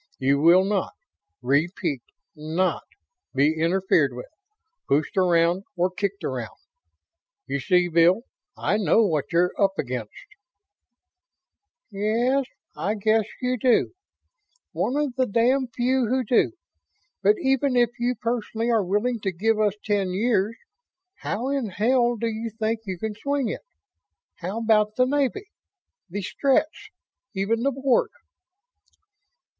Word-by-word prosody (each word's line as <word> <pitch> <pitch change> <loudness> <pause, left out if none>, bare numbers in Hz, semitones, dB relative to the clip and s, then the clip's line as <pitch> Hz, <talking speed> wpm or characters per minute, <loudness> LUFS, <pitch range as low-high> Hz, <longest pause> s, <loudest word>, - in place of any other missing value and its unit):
You 140 +1 +2
will 175 +4 +6
not 200 -1 -1 0.5
repeat 145 +1 0 0.3
NOT 160 +5 -1 0.5
be 145 +3 +3
interfered 165 -4 +1
with, 125 - -9 0.6
pushed 145 +3 0
around 175 0 +2
or 180 +1 +1
kicked 200 +1 -3
around. - - -4 0.9
You 140 - -2
see, 180 +6 +2
Bill, 175 +5 +3 0.3
I 210 - 0
know 215 +3 +3
what 155 -6 -1
you're 175 +1 +3
up 195 -1 +2
against." 125 -5 -4 1.8
"Yes, 235 +7 +1 0.3
I 210 - -1
guess 215 +1 +2 0.2
you 250 -1 0
do. 245 +7 +2 0.8
One 260 - -1
of 295 -4 -1
the 255 -1 +2
damned 245 +3 +1
few 255 0 +1
who 260 +3 +1
do. 245 +7 +2 0.7
But 205 +2 +4
even 270 0 +1
if 240 -2 +3
you 245 +1 0
personally 230 0 -2
are 225 -3 +2
willing 210 +6 0
to 195 -2 -2
give 215 +5 0
us 210 -2 +2
ten 200 -3 0
years, 215 +1 +1 0.6
how 235 +6 -3
in 275 -4 -1
hell 240 +5 +2
do 230 - -3
you 225 0 -3
think 220 +1 -2
you 190 -2 -4
can 220 +4 -4
swing 280 +2 -2
it? - - -5 0.8
How 185 +5 -5
about 215 -1 +2
the 255 - +3
Navy 285 +8 0 0.6
the 200 +3 -4
Stretts 275 +9 0 0.5
even 210 +4 0
the 275 - +2
Board?" 270 -1 +1
210 Hz, 130 wpm, -24 LUFS, 180-240 Hz, 1.8 s, will